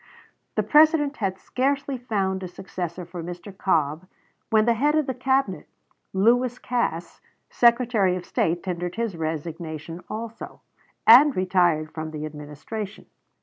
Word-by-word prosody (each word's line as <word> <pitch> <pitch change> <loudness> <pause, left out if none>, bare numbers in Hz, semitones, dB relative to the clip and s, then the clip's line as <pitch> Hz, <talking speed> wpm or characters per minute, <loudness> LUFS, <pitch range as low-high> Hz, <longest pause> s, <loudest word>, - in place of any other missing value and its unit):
The - - +1
President 305 -1 +4
had 190 -3 -2
scarcely 275 +5 -1
found 195 -5 -1
a 185 - -4
successor 180 -1 -6
for 175 0 -7
Mr. 175 +3 -8
Cobb 160 -2 0 0.4
when 220 -1 +4
the 235 - +4
head 290 +6 +2
of 310 -2 +2
his 260 -2 -4
Cabinet, 260 - 0 0.4
Lewis 240 +5 +2
Cass, 235 -11 -3 0.3
Secretary 235 -6 +3
of 180 -1 -6
State, 170 +1 0
tendered 175 -1 -4
his 230 -4 -2
resignation 160 +1 -5
also, 225 +1 -7 0.4
and 265 +5 +8
retired 175 -4 +2
from 155 0 -5
the 155 -1 -5
Administration. 155 +8 -7
190 Hz, 135 wpm, -24 LUFS, 170-240 Hz, 0.4 s, and